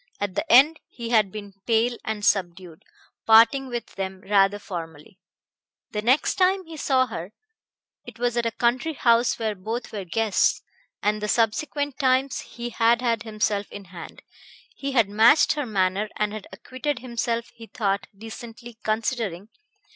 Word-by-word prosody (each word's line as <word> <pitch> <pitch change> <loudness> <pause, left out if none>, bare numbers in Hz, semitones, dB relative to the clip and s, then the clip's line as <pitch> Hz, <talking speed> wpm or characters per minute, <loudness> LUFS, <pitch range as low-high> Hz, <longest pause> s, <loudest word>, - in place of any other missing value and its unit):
At 205 -2 -2
the 310 - -2
end 290 +6 +6
he 235 -1 -7
had 215 -5 +3
been 205 -1 -8
pale 235 +1 +2
and 215 -2 -3
subdued, 175 -3 -1 0.5
parting 230 +5 +6
with 240 -2 -4
them 190 -1 -4
rather 200 0 +3
formally. 170 -2 -8 0.7
The 210 - -2
next 255 +7 +2
time 375 0 +3
he 325 0 -10
saw 265 -3 +2
her 190 -4 -7 0.7
it - - -12
was 240 0 -1
at 235 -1 +1
a - - -1
country 245 +8 0
house 235 -1 +3
where 220 -2 -1
both 220 +5 -5
were 205 -2 -4
guests 215 +4 +1 0.4
and 210 +1 +1
the 210 - -2
subsequent 270 +6 0
times, 260 0 +2
he 240 0 -7
had 235 +2 +2
had 230 -3 +1
himself 215 -2 -2
in 200 - -9
hand. 170 -2 -10 0.5
He 275 0 -4
had 230 -5 +4
matched 220 +8 +5
her 295 -4 -3
manner 195 0 0
and 210 0 -1
had 215 -2 -7
acquitted 255 +8 -4
himself, 235 -1 -3
he 225 -1 -12
thought, 200 -3 -2
decently, 225 +1 -10
considering 215 -3 -2
225 Hz, 160 wpm, -24 LUFS, 205-245 Hz, 0.7 s, end